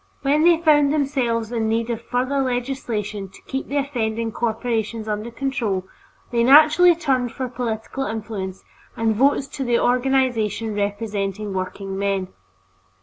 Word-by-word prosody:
When 285 +2 +3
they 345 -1 +6
found 295 -3 +4
themselves 250 -6 0
in 225 -2 0
need 230 +1 0
of 230 - -3
further 260 +3 -1
legislation 245 -6 -3
to - - -17
keep 265 0 -4
the 285 - -2
offending 230 -5 -1
corporations 225 -1 -2
under 215 +2 -3
control, 235 -7 -2 0.5
they 235 -1 +2
naturally 310 +6 +7
turned 260 -7 0
for 260 - -3
political 240 +1 -4
influence 210 -4 -5 0.3
and 225 -1 +1
votes 275 +4 +3
to 275 - -4
the 240 -2 +2
organization 245 -4 +1
representing 205 -1 -2
workingmen. 195 0 -2
235 Hz, 135 wpm, -22 LUFS, 215-270 Hz, 0.5 s, naturally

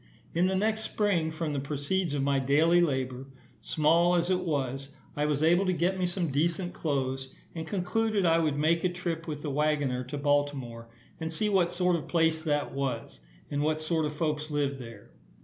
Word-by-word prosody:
In 175 +2 +3
the 190 - 0
next 220 +3 +1
spring, 200 -7 0
from 160 -1 -3
the 140 - -1
proceeds 145 +4 -1
of 140 - 0
my 140 0 +2
daily 155 +6 +4
labour, 130 -4 -1 0.3
small 170 +3 +3
as 175 +1 +1
it 185 - +2
was, 135 -5 -2 0.3
I 150 0 0
was 150 0 0
able 175 +4 +4
to 185 - +2
get 180 +3 0
me 180 - +1
some 175 -2 -1
decent 170 +5 0
clothes, 135 -3 -2 0.2
and 160 -1 -5
concluded 205 +1 0
I 165 0 +4
would 155 -3 0
make 160 +3 +2
a 185 - +3
trip 175 -2 -4
with 150 -2 -5
the 150 - -2
waggoner 145 -3 0
to 130 +3 -5
Baltimore, 140 -5 -1 0.3
and 160 -1 -3
see 210 +6 0
what 185 -4 +2
sort 180 0 +2
of 160 - -3
a - - -15
place 160 -2 +2
that 145 -4 -1
was, 135 - -3 0.3
and 145 0 0
what 155 +1 +1
sort 155 0 0
of 150 - -6
folks 150 -1 -1
lived 140 -2 -1
there. 115 -4 -11
155 Hz, 200 wpm, -29 LUFS, 140-175 Hz, 0.3 s, daily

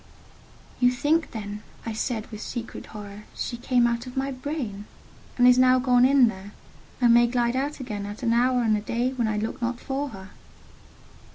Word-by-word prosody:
"You 245 - +5
think 295 +6 +1
then," 210 -2 -6 0.2
I 225 - -3
said, 220 0 -2
with 215 -1 -7
secret 235 0 -6
horror, 210 -1 -10
"she 240 - -3
came 245 0 +2
out 235 +1 -1
of 250 - -9
my 270 +1 -1
brain, 255 -7 -5 0.5
and 245 0 +6
is 250 0 +6
now 255 0 +6
gone 250 -1 +4
in 265 -2 +6
there, 200 -1 -6 0.5
and 240 -2 +5
may 240 0 +6
glide 240 0 0
out 285 +3 -2
again 210 -6 -5
at 205 +5 -8
an 230 -1 +2
hour 250 +1 +3
and 220 -2 +3
a 210 - -2
day 240 +4 -1
when 240 -3 0
I 215 -1 -1
look 220 +3 -3
not 240 0 -2
for 275 +2 -3
her?" 190 -4 -11
240 Hz, 195 wpm, -25 LUFS, 215-255 Hz, 0.5 s, and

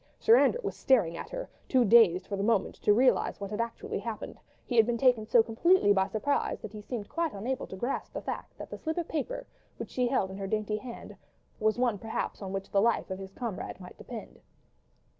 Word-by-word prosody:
Sir 455 - +6
Andrew 485 - +4
was - - -3
staring 210 -11 +3
at - - -7
her, - - -5 0.2
too 255 -3 +4
dazed 195 -5 +6
for 200 - -4
the 195 - -3
moment 215 -1 +1
to - - +4
realise 250 +5 +3
what 200 0 -5
had 210 +2 -1
actually 430 - -4
happened; - - -6 0.3
he 245 - -3
had 225 -1 +6
been 240 -1 0
taken 245 -4 +3
so 230 0 +5
completely 230 - +4
by 190 -1 +2
surprise, 220 +8 -1
that 215 - -8
he 210 - -7
seemed 210 -1 -5
quite 335 -3 -2
unable 240 +6 -3
to - - -8
grasp 240 +8 -3
the - - -3
fact - - -6
that - - -9
the - - -6
slip 320 +1 -3
of 345 - -2
paper, 325 - -3 0.3
which - - -7
she 250 -1 +1
held 240 -7 0
in 190 - -7
her 195 - -3
dainty 215 +1 -1
hand, 235 +2 -9 0.4
was 215 0 +2
one 240 -5 +1
perhaps 220 0 -4
on 190 -1 -5
which 195 0 -5
the 195 - +3
life 230 -3 +1
of 185 - -4
his 190 0 -8
comrade 210 -4 -5
might 180 -1 -11
depend. 235 -3 -9
225 Hz, 230 wpm, -29 LUFS, 200-255 Hz, 0.4 s, Sir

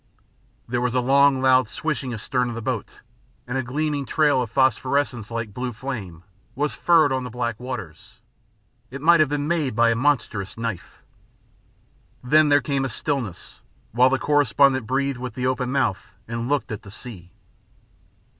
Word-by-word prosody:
There 120 +1 -1
was 125 0 -1
a - - +3
long, 135 +1 +4
loud 130 -3 +4
swishing 150 -5 -3
astern 125 +2 -1
of 120 - -5
the 115 - -5
boat, 120 -3 -4 0.4
and 125 - -5
a 135 - +1
gleaming 145 +2 -2
trail 150 -4 +2
of 120 - -3
phosphorescence, 130 -2 +1
like 115 -3 -4
blue 125 +2 -3
flame, 105 -10 -6 0.3
was 145 +2 -1
furrowed 165 -4 +4
on 130 -1 -1
the 125 - -6
black 120 -1 -3
waters. 110 -5 -8 0.7
It 140 - -7
might 170 +3 +5
have 155 -3 +4
been 145 0 -2
made 155 -8 0
by 115 0 +4
a - - +1
monstrous 115 -7 -1
knife. 115 -6 -6 1.2
Then 150 +4 +4
there 145 0 +5
came 140 -2 -1
a 135 - -2
stillness, 125 - -4 0.3
while 125 +3 +4
the 135 - +1
correspondent 140 -3 +3
breathed 135 +1 -1
with 125 0 -6
the 125 - -2
open 130 -1 -1
mouth 130 -8 -1
and 115 +2 -4
looked 145 -4 -1
at 105 - -5
the 100 - -13
sea. 100 -5 -10
130 Hz, 170 wpm, -23 LUFS, 115-140 Hz, 1.2 s, might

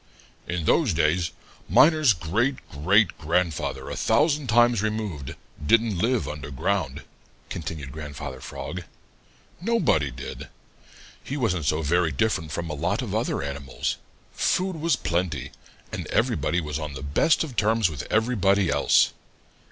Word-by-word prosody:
"In 85 -2 -2
those 115 - +3
days 85 +2 +2 0.4
Miner's 140 - +6
great 100 - 0 0.2
great 95 +8 +3
grandfather 85 0 -1
a - - -4
thousand 145 +4 +2
times 120 -1 +4
removed 105 -10 -3 0.3
didn't 110 +2 +3
live 120 +3 +1
under 75 -2 -6
ground," 65 -2 -2 0.5
continued 80 -5 -5
Grandfather 75 -3 -7
Frog. 90 - -6 0.8
"Nobody 185 - +2
did. - - -8 0.8
He 140 - -4
wasn't 90 - 0
so 75 +3 +1
very 85 +2 +2
different 80 0 0
from 85 +2 -3
a 75 - -4
lot 90 - -1
of 105 -5 -4
other 110 - -1
animals. 70 -1 -3 0.4
Food 185 -1 0
was 165 +1 +2
plenty, 80 -6 -2 0.4
and - - -5
everybody 85 - +1
was 75 -2 -3
on 75 -2 -5
the 65 - -7
best 70 - +2
of 140 -6 -7
terms 110 -1 +3
with 80 -3 -6
everybody 100 -5 +2
else. - - +4
90 Hz, 135 wpm, -25 LUFS, 75-115 Hz, 0.8 s, Miner's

